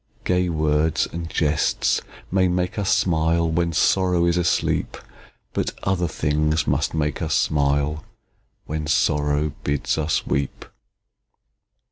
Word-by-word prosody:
Gay 90 0 +1
words 80 -1 +1
and 85 0 -5
jests 75 -3 +1 0.3
may 95 0 +3
make 90 +3 -1
us 100 - -1
smile, 85 -1 +2
When 85 +1 0
Sorrow 90 +2 +2
is 85 0 +2
asleep; 90 -1 0 0.6
But - - -2
other 95 -3 0
things 75 0 0
must - - 0
make 75 +1 -1
us 80 - 0
smile, 75 +1 +1 0.6
When 75 0 -4
Sorrow 75 0 +1
bids 75 +2 -1
us 75 -2 0
weep! 70 +1 -2
80 Hz, 120 wpm, -22 LUFS, 75-85 Hz, 0.6 s, may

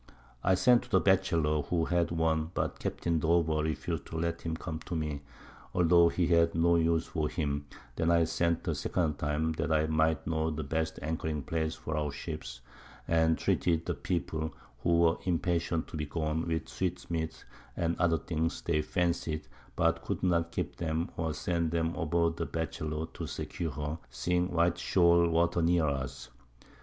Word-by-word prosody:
I 95 - +4
sent 120 +5 +5
to 125 - -14
the - - +4
Batchelor, 85 -6 +2
who 80 +3 0
had 85 0 +1
one, 80 -1 +1
but - - -1
Capt. - - -4 0.2
Dover 80 -1 +2
refus'd 80 -1 -3
to 80 - -5
let 85 +1 -1
him 80 -1 -3
come 80 -2 -5
to 85 - -3
me, 75 -3 -2 0.5
altho' 85 -1 +5
he 85 +1 +1
had 85 -1 +3
no 85 +1 +4
use 80 -1 +2
for 80 -3 -2
him; 70 -3 -2 0.3
then 80 - +1
I 85 -1 +5
sent 85 +1 0
a - - +2
second 80 -5 -1
time, 75 +2 0
that - - 0
I 80 0 +3
might 80 -1 +1
know 80 0 0
the 80 0 -3
best 80 +3 -2
anchoring 80 -1 -2
Place 80 0 -1
for 80 -1 -4
our 75 -1 -1
Ships, 70 -5 -6 0.5
and 80 -1 +3
treated 85 -2 +1
the 90 - -1
People 80 0 -3 0.2
(who 85 +7 +2
were 85 0 +4
impatient 85 -2 0
to - - -6
be 75 -1 -3
gone) 80 +2 -2
with 80 -1 -1
Sweet 90 -1 -3
meats 80 -1 -3 0.3
and 85 0 0
other 85 -2 +3
things 80 +2 -2
they 80 -2 +1
fancy'd, 85 -2 -1 0.3
but - - +1
could - - -3
not 85 -2 +2
keep - - -4
'em, 80 0 -1
or 80 -1 -1
send 85 -2 0
them 80 0 0
aboard 85 0 +1
the 85 - -2
Batchelor 80 -1 -3
to - - -5
secure 85 -2 -4
her, 75 +1 -4
seeing 90 +9 0
white 85 0 +2
Shole 85 -2 +4
Water 85 +1 +2
near 85 -1 +3
us. 65 -3 -3
80 Hz, 180 wpm, -31 LUFS, 80-85 Hz, 0.5 s, sent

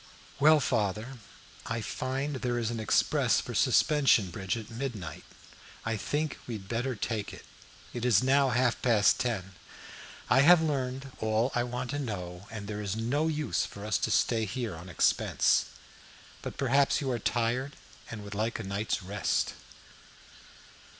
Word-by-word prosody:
"Well, 155 +2 +6
father, 110 +1 -1 0.5
I 115 0 -2
find 135 +5 -3
there 125 -1 -1
is 115 -1 -1
an 115 - -3
express 110 - +2
for - - -6
Suspension 135 - +3
Bridge 95 +4 -2
at 115 0 -8
midnight. 115 -8 -5 0.6
I 115 0 0
think 145 +8 -2
we 120 - -4
had 95 -3 -9
better 120 +4 -2
take 110 -1 -3
it. - - -12 0.5
It 120 - -4
is 120 -4 +4
now 135 +1 +4
half 125 0 +1
past 110 -4 +4
ten. 105 -7 -2 0.7
I 125 - +4
have 175 +4 +8
learned 135 -3 -2
all 110 +3 +1
I 120 - +1
wanted 125 +3 -3
to - - -2
know, 90 -4 -6
and 110 -3 -7
there 105 0 -5
is 100 -1 -3
no 130 +8 0
use 155 -2 0
for 100 0 -7
us 105 -3 +1
to - - -1
stay 110 -1 +2
here 110 -2 -4
on 85 +3 -10
expense. 85 - +2 0.8
But - - -7
perhaps 140 +1 +3
you 135 -3 -2
are 120 - -1
tired, 120 +5 0 0.4
and 110 -3 -7
would 100 0 -8
like 110 +3 -1
a 110 - -5
night's 100 +1 -2
rest." 100 +2 -1
115 Hz, 165 wpm, -29 LUFS, 105-130 Hz, 0.8 s, have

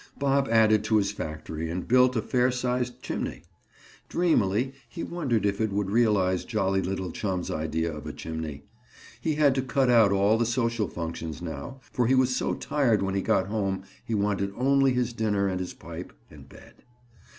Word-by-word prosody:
Bob 140 0 +2
added 110 -2 +4
to 110 0 +2
his 100 -1 +1
factory 80 -2 -5
and 90 +2 -4
built 125 +1 +4
a 110 - 0
fair 125 0 +2
sized 125 -1 -2
chimney. - - -4 0.7
Dreamily 130 - +1 0.2
he 170 - -6
wondered 135 -12 -1
if 100 +1 0
it 110 -2 +1
would 100 0 -1
realize 100 -5 +2
jolly 95 -4 0
little 95 -1 -3
chum's 95 -1 -3
idea 80 +1 -2
of 75 - -8
a - - -3
chimney. 80 -3 -6 0.6
He 155 -2 0
had 145 -3 +4
to 130 - 0
cut 130 -1 +1
out 115 -4 +6
all 100 +3 +3
the 120 - +2
social 115 -3 0
functions 80 -1 -5
now 85 - -7
for 120 -2 +1
he 130 - +4
was 130 -1 +3
so - - 0
tired 120 -9 +1
when 95 0 -1
he 100 - 0
got 95 - +2
home 95 -2 -2 0.2
he 115 - -2
wanted 100 -1 0
only 135 +1 +3
his 125 -1 0
dinner 105 -3 0
and 95 -1 -1
his 90 - -5
pipe - - -9 0.2
and - - -14
bed. - - -17
110 Hz, 185 wpm, -27 LUFS, 95-125 Hz, 0.7 s, out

